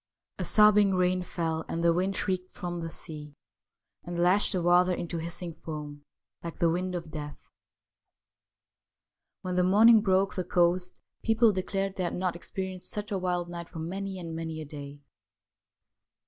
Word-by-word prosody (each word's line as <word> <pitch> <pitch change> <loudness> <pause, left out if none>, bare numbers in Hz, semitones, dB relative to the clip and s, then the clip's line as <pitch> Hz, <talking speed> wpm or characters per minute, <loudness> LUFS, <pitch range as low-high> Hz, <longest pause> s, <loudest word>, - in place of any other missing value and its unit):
A - - -1
sobbing 210 -2 +6
rain 185 0 +2
fell, 165 -2 -2
and 170 - -3
the 170 0 +5
wind 190 +3 0
shrieked 185 -1 -2
from 175 -1 -5
the 165 0 -5
sea 150 -3 -7 0.7
and 175 0 -5
lashed 180 +4 +3
the 185 - 0
water 175 +1 +5
into 170 -1 -3
hissing 170 +1 -4
foam, 150 -2 -8 0.4
like 170 -1 -6
the 170 -2 +3
wind 180 +2 -2
of 165 -2 -6
death. 150 -1 -8 1.9
When 180 0 -2
the 180 - +4
morning 215 +4 +7
broke 195 -1 +2
the 185 - -2
coast 180 +1 +1 0.2
people 225 0 +4
declared 195 0 -2
they 185 - -1
bad - - -2
not 180 -1 -1
experienced 185 +1 -5
such 210 0 -5
a 195 - 0
wild 180 -1 -1
night 170 -1 -7
for 170 - -10
many 190 +4 -4
and 165 -2 -6
many 160 -1 -4
a 155 - -6
day. 145 -1 -9
180 Hz, 165 wpm, -28 LUFS, 165-190 Hz, 1.9 s, morning